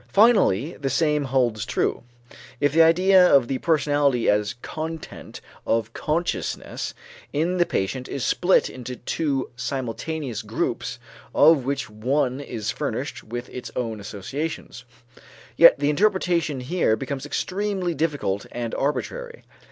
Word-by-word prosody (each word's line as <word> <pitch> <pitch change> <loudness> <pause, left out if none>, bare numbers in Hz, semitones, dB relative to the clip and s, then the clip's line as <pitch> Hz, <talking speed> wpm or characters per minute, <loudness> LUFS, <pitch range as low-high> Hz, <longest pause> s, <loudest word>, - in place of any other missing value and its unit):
Finally 195 - +4
the 135 -1 -2
same 150 +1 +1
holds 125 -5 +1
true, - - -1 0.6
if 145 -1 +2
the 165 - +6
idea 185 +3 +6
of 140 -8 +5
the 130 0 -2
personality 145 -5 +2
as 105 +2 +2
content 160 0 -7 0.2
of 115 0 0
consciousness 165 +3 -2 0.4
in 170 +5 0
the 175 - +3
patient 125 +7 -2
is 135 - -3
split 180 +1 +3
into 125 0 -7
two 135 +1 -2
simultaneous 130 +1 -4
groups, - - -3 0.4
of 150 -4 +6
which 135 0 -1
each - - -13
one 130 +4 0
is 115 -6 -4
furnished - - -4
with 120 +2 -6
its 125 - -7
own 115 -4 -3
associations. 125 +6 -5 0.7
Yet - - +8
the 145 +1 +1
interpretation 175 -6 +1
here 140 -4 +1
becomes 135 +3 -5
extremely 190 +1 -2
difficult 145 -12 -1
and 120 -1 -4
arbitrary. 475 - -3
140 Hz, 130 wpm, -24 LUFS, 125-165 Hz, 0.7 s, Yet